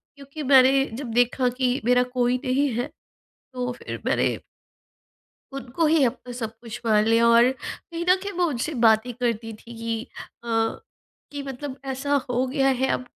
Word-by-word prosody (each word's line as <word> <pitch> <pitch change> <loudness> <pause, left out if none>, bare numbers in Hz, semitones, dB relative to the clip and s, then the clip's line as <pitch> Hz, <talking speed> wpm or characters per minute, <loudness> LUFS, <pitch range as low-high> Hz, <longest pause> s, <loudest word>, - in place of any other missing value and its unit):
क्योंकि 280 +2 -8
मैंने 270 0 +5
जब 270 +2 -5
देखा 245 +2 +2
कि 255 0 +1
मेरा 250 +1 +4
कोई 245 0 +2
नहीं 270 +3 +2
है 240 +4 -2 0.7
तो 250 -1 -2
फ़िर - - -8
मैंने - - +2 1.3
उनको 275 +4 -1
ही 310 -1 +4
अपना 250 0 -3
सब 230 -3 -5
कुछ 240 0 -8
मान 215 -1 +4
लिया 230 +1 +4
और 235 +2 +6
कहीं 335 +5 -7
न 365 - +7
कहीं 405 0 -4
मैं 355 - +3
उनसे 300 -1 -2
बातें 220 +3 +3
करती 230 -2 -2
थी 235 +2 -13
कि 230 -1 -3 0.4
अ, - - -8 0.8
कि 285 -1 -5
मतलब 270 0 -6
ऐसा 270 +2 -2 0.2
हो 250 +1 +1
गया 270 +1 +1
है 265 - +2
अब - - -2
255 Hz, 170 wpm, -24 LUFS, 235-275 Hz, 1.3 s, न